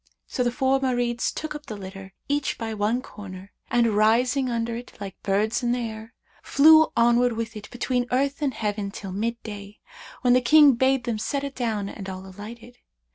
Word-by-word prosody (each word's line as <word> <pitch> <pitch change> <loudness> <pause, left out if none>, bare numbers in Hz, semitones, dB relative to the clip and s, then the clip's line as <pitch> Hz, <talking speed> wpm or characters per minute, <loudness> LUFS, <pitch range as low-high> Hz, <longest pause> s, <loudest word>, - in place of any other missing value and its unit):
So - - -3
the 240 - +1
four 265 +2 +1
Marids 245 -2 0
took 310 -1 -5
up 300 -1 -9
the 215 - -6
litter, 195 0 -10
each 285 0 -1
by 225 -1 -4
one 215 +4 0
corner, 195 -1 -10 0.2
and 235 -3 +2
rising 245 +5 +3
under 230 -1 -2
it 240 +1 -8
like 195 -2 -8
birds 210 +5 0
in 240 0 +1
air, 225 -1 -6 0.3
flew 315 +2 +6
onward 240 +1 +4
with 225 0 -4
it 210 -1 -9
between 245 0 -1
earth 275 +4 0
and 275 -5 0
heaven 205 -2 -2
till 195 -1 -7
mid 230 +5 -2
day, 205 -1 -8 0.4
when 245 -1 +4
the 255 - +4
King 295 +4 +7
bade 260 +1 +2
them 230 -2 -2
set 280 +5 -2
it 280 -1 -4
down 220 -6 -2
and 195 -1 -7
all 190 0 -7
alighted. 225 +5 -11
235 Hz, 190 wpm, -25 LUFS, 210-255 Hz, 0.4 s, King